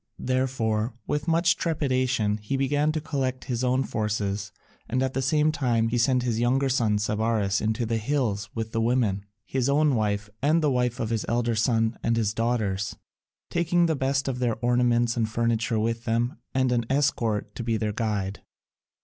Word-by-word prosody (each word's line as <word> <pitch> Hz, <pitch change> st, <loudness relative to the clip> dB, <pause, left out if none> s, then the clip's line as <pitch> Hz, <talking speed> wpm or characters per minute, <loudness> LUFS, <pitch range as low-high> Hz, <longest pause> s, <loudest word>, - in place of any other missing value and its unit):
Therefore, 125 Hz, -3 st, -1 dB
with 150 Hz, +2 st, -2 dB
much 170 Hz, +1 st, +3 dB
trepidation, 130 Hz, -9 st, 0 dB
he 105 Hz, +6 st, -3 dB
began 145 Hz, +3 st, +1 dB
to 155 Hz, -, -2 dB
collect 135 Hz, -4 st, -2 dB
his 125 Hz, -1 st, -2 dB
own 130 Hz, +1 st, +2 dB
forces, 105 Hz, -3 st, -2 dB, 0.4 s
and 130 Hz, +3 st, +1 dB
at 130 Hz, 0 st, -1 dB
the 135 Hz, -, -1 dB
same 150 Hz, +3 st, +2 dB
time 120 Hz, -6 st, +1 dB
he 120 Hz, +1 st, 0 dB
sent 125 Hz, +1 st, +2 dB
his 115 Hz, -2 st, -1 dB
younger 130 Hz, +3 st, +2 dB
son 115 Hz, -5 st, +2 dB
Sabaris 105 Hz, -1 st, 0 dB
into 110 Hz, +2 st, 0 dB
the 115 Hz, 0 st, -1 dB
hills 110 Hz, -5 st, -1 dB
with 115 Hz, -1 st, -3 dB
the 115 Hz, -, 0 dB
women, 110 Hz, -5 st, +1 dB, 0.2 s
his 130 Hz, 0 st, -1 dB
own 150 Hz, +1 st, +3 dB
wife, 105 Hz, -3 st, 0 dB
and 155 Hz, +4 st, +3 dB
the 150 Hz, -, +3 dB
wife 125 Hz, -1 st, 0 dB
of 115 Hz, -3 st, -2 dB
his 115 Hz, -2 st, 0 dB
elder 120 Hz, 0 st, +1 dB
son 115 Hz, 0 st, +1 dB
and 115 Hz, 0 st, +1 dB
his 105 Hz, -2 st, +1 dB
daughters, 110 Hz, -4 st, -1 dB, 0.6 s
taking 170 Hz, 0 st, +2 dB
the 160 Hz, -2 st, +1 dB
best 135 Hz, 0 st, 0 dB
of 130 Hz, -2 st, -2 dB
their 120 Hz, -3 st, +1 dB
ornaments 120 Hz, 0 st, +2 dB
and 115 Hz, -2 st, 0 dB
furniture 115 Hz, 0 st, 0 dB
with 115 Hz, +2 st, -1 dB
them 120 Hz, +2 st, 0 dB
and 130 Hz, -1 st, +1 dB
an 120 Hz, -1 st, +1 dB
escort 115 Hz, -7 st, 0 dB
to -, -, -6 dB
be 115 Hz, -1 st, 0 dB
their 105 Hz, -1 st, -2 dB
guide. 105 Hz, -3 st, -2 dB
120 Hz, 185 wpm, -26 LUFS, 110-135 Hz, 0.6 s, much